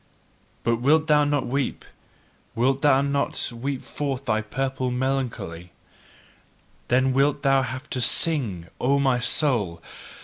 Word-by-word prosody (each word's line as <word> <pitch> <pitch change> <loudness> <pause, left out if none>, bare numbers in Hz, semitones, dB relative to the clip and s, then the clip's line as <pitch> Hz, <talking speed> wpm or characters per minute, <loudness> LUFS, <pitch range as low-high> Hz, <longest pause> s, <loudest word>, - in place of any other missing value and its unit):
But 115 0 +1
wilt 150 +6 +3
thou 150 -2 +4
not 145 -2 0
weep, 135 +1 -2 0.7
wilt 130 +3 +1
thou 140 -2 +4
not 140 -2 -1
weep 130 +3 -4
forth 140 -2 -4
thy 110 -2 +1
purple 130 +3 -2
melancholy, 125 -10 -3 1.1
then 130 +1 +2
wilt 140 +2 +2
thou 135 -1 +4
have 130 +3 -5
to 125 - -2
SING, 120 - +1
O 140 +3 +2
my 135 -3 +2
soul! 115 - 0
130 Hz, 130 wpm, -24 LUFS, 120-140 Hz, 1.1 s, thou